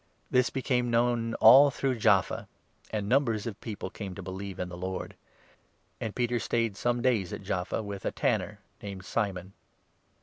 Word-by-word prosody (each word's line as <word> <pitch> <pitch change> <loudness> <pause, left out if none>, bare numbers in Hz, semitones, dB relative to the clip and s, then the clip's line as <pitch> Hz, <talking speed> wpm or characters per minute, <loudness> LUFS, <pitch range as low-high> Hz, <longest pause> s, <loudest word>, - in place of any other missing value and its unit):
This 125 -1 +4
42 - - -23
became 125 -2 0
known 115 0 +1
all 135 +6 +8
through 130 -2 -1
Jaffa, 100 -4 +2 0.4
and 105 -2 -3
numbers 115 -4 +2
of 115 -4 -6
people 110 -3 -6
came 100 -4 -7
to 100 - -7
believe 95 +1 -6
in 90 - -3
the 90 - -8
Lord. 95 +1 -5 0.8
And 110 - -4
Peter 120 -1 0
stayed 115 -2 0
some 120 +2 0
days 115 -8 +2
43 105 - -4
at 100 - -15
Jaffa 90 +4 -2
with 100 -1 -6
a - - -1
tanner - - -1 0.2
named 95 -2 -7
Simon. 95 -4 -2
110 Hz, 175 wpm, -29 LUFS, 95-120 Hz, 0.8 s, all